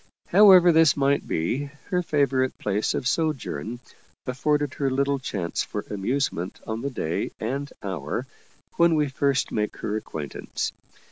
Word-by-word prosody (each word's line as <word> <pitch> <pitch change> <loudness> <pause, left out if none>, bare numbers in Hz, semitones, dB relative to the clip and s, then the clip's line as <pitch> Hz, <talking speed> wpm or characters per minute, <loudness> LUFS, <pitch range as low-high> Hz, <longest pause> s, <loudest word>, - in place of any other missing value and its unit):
However 185 -2 +8
this 160 -3 +5
might 140 0 +1
be, 120 - -1 0.3
her 180 -1 +2
favorite 140 -5 +1
place 105 +1 -1
of 125 - -1
sojourn 135 -6 -2 0.5
afforded 145 +2 0
her 140 -1 0
little 140 +1 +1
chance 95 -9 -3
for - - -4
amusement 105 -3 -2
on 110 +1 -3
the 140 - -2
day 85 - -2
and 140 +5 -3
hour 95 - -3 0.5
when 170 -1 +5
we 150 -2 +1
first 140 0 0
make 105 -1 -2
her 105 - -3
acquaintance. 80 -9 -4
135 Hz, 140 wpm, -25 LUFS, 110-145 Hz, 0.5 s, However